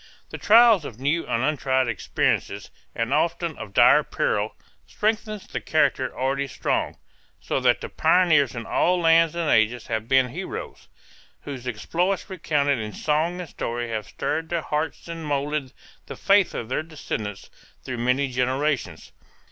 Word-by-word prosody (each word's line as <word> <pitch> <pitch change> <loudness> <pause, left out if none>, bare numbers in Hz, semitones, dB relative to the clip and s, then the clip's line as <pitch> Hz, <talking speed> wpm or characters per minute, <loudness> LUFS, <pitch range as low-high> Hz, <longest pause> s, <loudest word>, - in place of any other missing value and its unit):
The - - -6
trials 225 -4 +6
of 120 -5 -9
new 150 +5 0
and 115 - 0
untried 130 -3 +1
experiences 115 -4 -1 0.2
and 115 +3 -1
often 165 +1 0
of 95 - -8
dire - - +6
peril - - -1 0.3
strengthen 215 0 -1
the - - -3
character 135 -4 +1
already 135 +2 -1
strong, - - -2 0.4
so - - -2
that - - +2
the - - -5
pioneers 155 -8 +3
in 115 -1 -5
all 180 +1 +2
lands 165 -1 +4
and 170 -2 -1
ages 110 -1 +2
have 110 -1 -3
been 130 0 +3
heroes - - -7 0.5
whose 130 -3 -7
exploits 175 - -2
recounted 145 -6 0
in 105 -1 -5
song 160 +4 0
and 175 - -8
story 120 0 -4
have 110 -2 -3
stirred 160 +2 -3
the 170 -2 -1
hearts 155 +3 -3
and 165 -1 -6
molded 145 -2 -2 0.4
the - - -7
faith 200 -1 +3
of 115 - -4
their 130 - -1
descendants 110 -10 -6 0.3
through 125 -2 -5
many 125 +4 +1
generations. 130 +2 -2
145 Hz, 155 wpm, -24 LUFS, 125-165 Hz, 0.5 s, trials